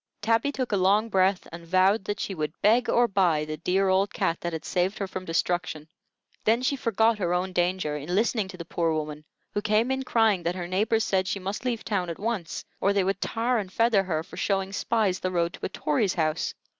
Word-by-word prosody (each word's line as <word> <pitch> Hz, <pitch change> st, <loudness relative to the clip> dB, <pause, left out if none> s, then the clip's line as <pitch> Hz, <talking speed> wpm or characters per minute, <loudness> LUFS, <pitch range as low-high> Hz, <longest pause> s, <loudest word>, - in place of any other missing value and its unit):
Tabby 225 Hz, +6 st, +1 dB
took 260 Hz, -4 st, -3 dB
a 205 Hz, -, +2 dB
long 200 Hz, +4 st, +3 dB
breath, 190 Hz, -1 st, +2 dB
and 170 Hz, 0 st, -9 dB
vowed 190 Hz, +4 st, +3 dB
that 205 Hz, 0 st, -3 dB
she 200 Hz, -, -3 dB
would 155 Hz, -2 st, -4 dB
beg 230 Hz, +4 st, +4 dB
or 240 Hz, 0 st, +4 dB
buy 180 Hz, -7 st, +2 dB
the 155 Hz, 0 st, -5 dB
dear 190 Hz, +4 st, +1 dB
old 190 Hz, +1 st, +2 dB
cat 185 Hz, -7 st, -1 dB
that 175 Hz, -, -2 dB
had 160 Hz, -1 st, -5 dB
saved 185 Hz, +2 st, 0 dB
her 200 Hz, -, -2 dB
from 185 Hz, -1 st, -6 dB
destruction. 165 Hz, -2 st, -1 dB, 0.6 s
Then 230 Hz, +3 st, +2 dB
she 280 Hz, -, +1 dB
forgot 225 Hz, -3 st, +1 dB
her 175 Hz, -2 st, 0 dB
own 185 Hz, +1 st, -2 dB
danger 175 Hz, -4 st, 0 dB
in 150 Hz, +5 st, -3 dB
listening 215 Hz, -1 st, +1 dB
to 190 Hz, -1 st, -10 dB
the 170 Hz, -, -7 dB
poor 165 Hz, -1 st, 0 dB
woman, 150 Hz, -1 st, -4 dB, 0.3 s
who 205 Hz, -, -1 dB
came 215 Hz, +4 st, +2 dB
in 265 Hz, 0 st, 0 dB
crying 225 Hz, -7 st, +2 dB
that 170 Hz, +1 st, -1 dB
her 175 Hz, -2 st, -4 dB
neighbors 215 Hz, +5 st, +1 dB
said 190 Hz, -1 st, 0 dB
she -, -, -1 dB
must 195 Hz, +5 st, -5 dB
leave 240 Hz, -3 st, -1 dB
town 185 Hz, -5 st, -1 dB
at 170 Hz, -, -5 dB
once, 210 Hz, -6 st, -3 dB
or 200 Hz, -, +2 dB
they 200 Hz, -1 st, +2 dB
would 195 Hz, +1 st, -1 dB
tar 235 Hz, +1 st, 0 dB
and 190 Hz, -3 st, -5 dB
feather 230 Hz, -1 st, +3 dB
her 165 Hz, -4 st, -2 dB
for -, -, -13 dB
showing 195 Hz, -1 st, -1 dB
spies 205 Hz, -3 st, 0 dB
the 185 Hz, -, -1 dB
road 170 Hz, -1 st, 0 dB
to -, -, -6 dB
a -, -, -14 dB
Tory's 180 Hz, +3 st, 0 dB
house. 155 Hz, -1 st, -1 dB
190 Hz, 230 wpm, -26 LUFS, 175-215 Hz, 0.6 s, beg